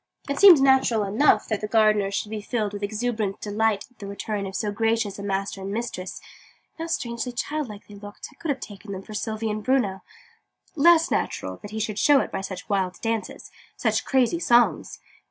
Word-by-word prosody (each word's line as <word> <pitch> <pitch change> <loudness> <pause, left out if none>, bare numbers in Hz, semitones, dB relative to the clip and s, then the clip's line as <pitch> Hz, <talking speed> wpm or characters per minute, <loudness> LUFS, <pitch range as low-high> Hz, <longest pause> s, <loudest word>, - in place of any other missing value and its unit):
It 280 0 -2
seemed 375 -7 +9
natural 265 -5 +4
enough 215 +9 +3
that 215 -2 -2
the 210 - -2
gardener 215 -2 +3
should 200 +2 -3
be 215 -1 -4
filled 210 -1 -2
with 205 - -6
exuberant 215 -1 -2
delight 210 0 0
at 250 - -31
the 200 - -7
return 200 0 -4
of 190 - -8
so 210 +1 -1
gracious 225 -1 0
a - - -5
master 195 0 -2
and 195 +1 -5
mistress 205 -4 -4 0.6
and 330 - -5
how - - -6
strangely 245 -6 -3
childlike 245 -4 -4
they 205 - -13
looked! 205 0 -10
I - - -21
could 330 - -6
have 275 - 0
taken 200 0 -9
them 190 0 -7
for 215 - -11
Sylvie 220 +1 -2
and 210 0 -4
Bruno 210 -7 +1 0.7
less 330 +2 +5
natural - - -2
that 205 - -10
he 220 +1 -5
should 215 -1 -2
show 290 -2 +5
it - - -3
by - - -3
such 190 -1 -7
wild 190 -3 -1
dances, 225 -1 -3 0.3
such - - 0
crazy 265 +5 +2
songs! 240 -6 +2
215 Hz, 205 wpm, -25 LUFS, 200-245 Hz, 0.7 s, seemed